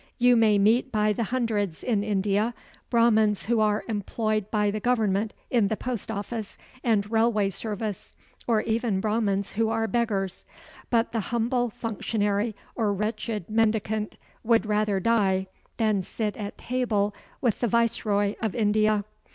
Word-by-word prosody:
You 245 Hz, 0 st, +5 dB
may 220 Hz, -3 st, +4 dB
meet 225 Hz, +6 st, +3 dB
by 210 Hz, -1 st, +2 dB
the 230 Hz, +2 st, -1 dB
hundreds 215 Hz, -8 st, -1 dB
in 215 Hz, -5 st, +1 dB
India 210 Hz, +2 st, 0 dB, 0.3 s
Brahmans 220 Hz, -3 st, +3 dB
who 230 Hz, +1 st, +2 dB
are 210 Hz, -1 st, +2 dB
employed 215 Hz, -1 st, -1 dB
by 210 Hz, -2 st, +1 dB
the 215 Hz, -, -3 dB
government 215 Hz, -3 st, +1 dB, 0.2 s
in 230 Hz, -5 st, +3 dB
the 220 Hz, +1 st, -2 dB
post 245 Hz, -5 st, -4 dB
office 220 Hz, 0 st, -5 dB, 0.3 s
and 215 Hz, -3 st, +1 dB
railway 220 Hz, -3 st, +2 dB
service, 210 Hz, 0 st, -5 dB, 0.3 s
or 225 Hz, -3 st, +3 dB
even 225 Hz, -3 st, 0 dB
Brahmans 205 Hz, -2 st, 0 dB
who 220 Hz, +1 st, +1 dB
are 225 Hz, 0 st, 0 dB
beggars. 215 Hz, -6 st, -1 dB, 0.5 s
But 230 Hz, -1 st, +2 dB
the 230 Hz, -, -1 dB
humble 240 Hz, +1 st, +1 dB
functionary 210 Hz, -1 st, -1 dB, 0.2 s
or 220 Hz, -4 st, 0 dB
wretched 210 Hz, -1 st, -3 dB
mendicant 215 Hz, -1 st, 0 dB, 0.3 s
would 230 Hz, 0 st, +3 dB
rather 210 Hz, -2 st, +1 dB
die 190 Hz, -3 st, +2 dB, 0.3 s
than 215 Hz, -4 st, +2 dB
sit 210 Hz, +3 st, -3 dB
at 205 Hz, -2 st, -6 dB
table 220 Hz, -5 st, 0 dB, 0.3 s
with 235 Hz, -5 st, 0 dB
the 240 Hz, -, +1 dB
viceroy 210 Hz, -3 st, +1 dB
of 220 Hz, -3 st, -1 dB
India. 215 Hz, -2 st, +2 dB
215 Hz, 145 wpm, -26 LUFS, 205-230 Hz, 0.5 s, You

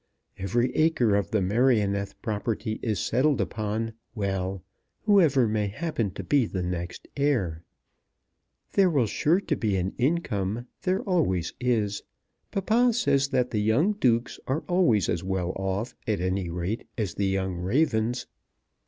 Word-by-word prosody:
Every 120 Hz, +6 st, 0 dB
acre 140 Hz, -10 st, +3 dB
of 100 Hz, -1 st, 0 dB
the 105 Hz, -3 st, +1 dB
Merioneth 100 Hz, -2 st, +2 dB
property 110 Hz, +1 st, -2 dB
is 110 Hz, -4 st, -1 dB
settled 135 Hz, +4 st, +2 dB
upon, 110 Hz, +1 st, -2 dB, 0.2 s
well, 95 Hz, -3 st, -2 dB, 0.4 s
whoever 160 Hz, -, +4 dB
may 105 Hz, -1 st, 0 dB
happen 115 Hz, 0 st, -2 dB
to -, -, -5 dB
be 140 Hz, -6 st, +2 dB
the 95 Hz, -3 st, -3 dB
next 90 Hz, -1 st, -4 dB
heir. 115 Hz, -, 0 dB, 1.1 s
There 195 Hz, -2 st, +4 dB
will 140 Hz, -8 st, +2 dB
sure 155 Hz, -, +2 dB
to 160 Hz, -6 st, -1 dB
be 105 Hz, -7 st, 0 dB
an 95 Hz, +1 st, -1 dB
income. 120 Hz, -, 0 dB, 0.2 s
There 185 Hz, +1 st, 0 dB
always 140 Hz, -, 0 dB
is. 110 Hz, -5 st, 0 dB, 0.5 s
Papa 230 Hz, +5 st, +2 dB
says 140 Hz, -, +2 dB
that 130 Hz, -3 st, 0 dB
the 105 Hz, -, 0 dB
young 125 Hz, -, +3 dB
dukes 125 Hz, -, +1 dB
are 140 Hz, +5 st, 0 dB
always 175 Hz, -, +3 dB
as 85 Hz, -, -1 dB
well 95 Hz, -1 st, -1 dB
off, 95 Hz, +4 st, -2 dB
at 105 Hz, -4 st, +1 dB
any 90 Hz, 0 st, -1 dB
rate, 90 Hz, +6 st, -3 dB
as 105 Hz, -7 st, -2 dB
the 100 Hz, -, 0 dB
young 95 Hz, -1 st, -1 dB
ravens. 115 Hz, -, +1 dB
110 Hz, 145 wpm, -26 LUFS, 95-140 Hz, 1.1 s, whoever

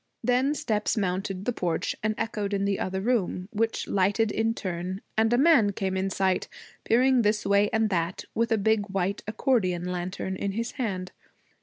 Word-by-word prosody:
Then 255 Hz, +4 st, +2 dB
steps 215 Hz, -3 st, -1 dB
mounted 190 Hz, 0 st, -2 dB
the 245 Hz, -, 0 dB
porch 175 Hz, -6 st, -1 dB
and 215 Hz, 0 st, 0 dB
echoed 210 Hz, -3 st, -2 dB
in 200 Hz, 0 st, 0 dB
the 200 Hz, -1 st, 0 dB
other 190 Hz, 0 st, -2 dB
room, 200 Hz, -5 st, 0 dB
which 225 Hz, +1 st, -1 dB
lighted 205 Hz, +3 st, +2 dB
in 225 Hz, +1 st, 0 dB
turn, 185 Hz, 0 st, -4 dB
and 220 Hz, +1 st, +3 dB
a 240 Hz, -, +4 dB
man 260 Hz, -8 st, +5 dB
came 190 Hz, -1 st, -2 dB
in 190 Hz, +1 st, 0 dB
sight, 190 Hz, -1 st, 0 dB, 0.4 s
peering 255 Hz, +2 st, +4 dB
this 210 Hz, -1 st, +1 dB
way 200 Hz, +1 st, +3 dB
and 220 Hz, -1 st, +1 dB
that, 170 Hz, 0 st, -1 dB
with 230 Hz, +1 st, 0 dB
a 225 Hz, -, +4 dB
big 215 Hz, 0 st, +1 dB
white 195 Hz, 0 st, -1 dB
accordeon 215 Hz, -6 st, +1 dB
lantern 180 Hz, +1 st, -3 dB
in 195 Hz, +1 st, -3 dB
his 230 Hz, +3 st, -2 dB
hand. 190 Hz, -8 st, -3 dB
205 Hz, 180 wpm, -27 LUFS, 190-225 Hz, 0.4 s, man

